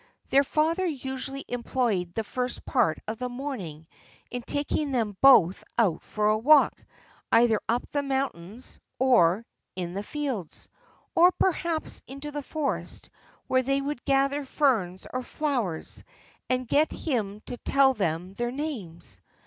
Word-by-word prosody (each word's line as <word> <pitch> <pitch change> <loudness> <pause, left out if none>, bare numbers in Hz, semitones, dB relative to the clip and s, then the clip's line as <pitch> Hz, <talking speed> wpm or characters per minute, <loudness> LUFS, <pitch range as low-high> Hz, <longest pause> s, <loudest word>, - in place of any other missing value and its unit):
Their 275 +1 +5
father 315 +6 +1
usually 270 -2 -4
employed 235 -7 -1
the 225 - -1
first 250 +3 -3
part 225 - +2
of 220 +1 -4
the 250 0 -2
morning 240 - -6 0.5
in 245 - -3
taking 285 +3 -1
them 225 -6 0
both 200 -10 +6
out 205 -9 +2
for 210 -1 -1
a 215 - +3
walk, 290 +5 +5 0.5
either 230 -2 +4
up 240 +2 0
the 290 - 0
mountains, 260 -6 -4 0.2
or 230 -6 +4 0.3
in 175 -2 -4
the 200 - -3
fields, 250 - -4 0.5
or 350 +2 +7
perhaps 340 -4 -1
into 275 +2 -7
the 290 0 -4
forest, 290 0 -4 0.3
where 260 0 +2
they 275 +2 +1
would 280 -2 -4
gather 275 +1 +2
ferns 230 - 0
or 255 - -1
flowers, 245 - -2 0.5
and 255 -1 0
get 300 +5 +3
him 215 -8 -2
to 245 - -7
tell 270 +2 +3
them 180 -4 -2
their 240 +3 -2
names. 205 - -6
255 Hz, 140 wpm, -27 LUFS, 210-275 Hz, 0.5 s, or